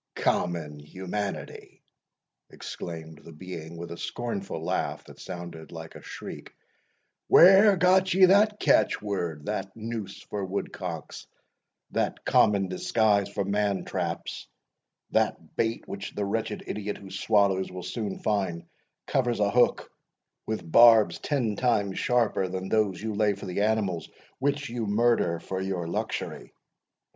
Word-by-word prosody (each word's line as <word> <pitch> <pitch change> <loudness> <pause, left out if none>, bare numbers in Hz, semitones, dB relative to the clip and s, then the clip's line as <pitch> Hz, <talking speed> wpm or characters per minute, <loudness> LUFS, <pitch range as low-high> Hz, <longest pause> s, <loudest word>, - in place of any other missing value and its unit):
"Common 80 -4 -1
humanity!" 95 +6 -6 0.7
exclaimed 80 -2 -8
the 85 - -12
being, 85 0 -8
with 85 0 -7
a 85 - -6
scornful 100 -8 -4
laugh 85 +3 -2
that - - -15
sounded 85 -2 -8
like 80 -1 -8
a - - -11
shriek, - - -9 0.7
"where 195 +3 +8
got 185 +1 +4
ye 185 +1 +7
that 210 +3 +4
catch - - +3
word 85 -8 -3
that 95 -2 -4
noose 110 -3 -6
for 100 -1 -4
woodcocks 90 -4 -5 0.6
that - - -2
common 100 -2 +4
disguise 100 +2 +1
for 100 - -2
man 100 0 0
traps - - -4 0.6
that - - 0
bait 115 0 -1
which 100 0 -6
the 100 - -1
wretched 105 +1 -2
idiot 105 -1 -4
who 95 -1 -12
swallows, 100 -1 +2
will 90 0 -7
soon 100 +2 -4
find 95 -5 -1 0.4
covers 120 -4 0
a 100 -1 +2
hook 125 +2 +2 0.6
with 110 -7 -4
barbs 110 -7 +7
ten 125 -8 -1
times 100 -5 +1
sharper 115 -6 +1
than 95 +1 -4
those 105 -4 +1
you 110 -1 -2
lay 105 -1 +2
for 100 - -9
the 95 +1 -2
animals 105 -5 0 0.3
which 140 +1 0
you 115 -2 -3
murder 105 -5 +2
for 95 +2 -4
your 95 -3 -3
luxury!" 85 - -4
100 Hz, 135 wpm, -27 LUFS, 90-115 Hz, 0.7 s, where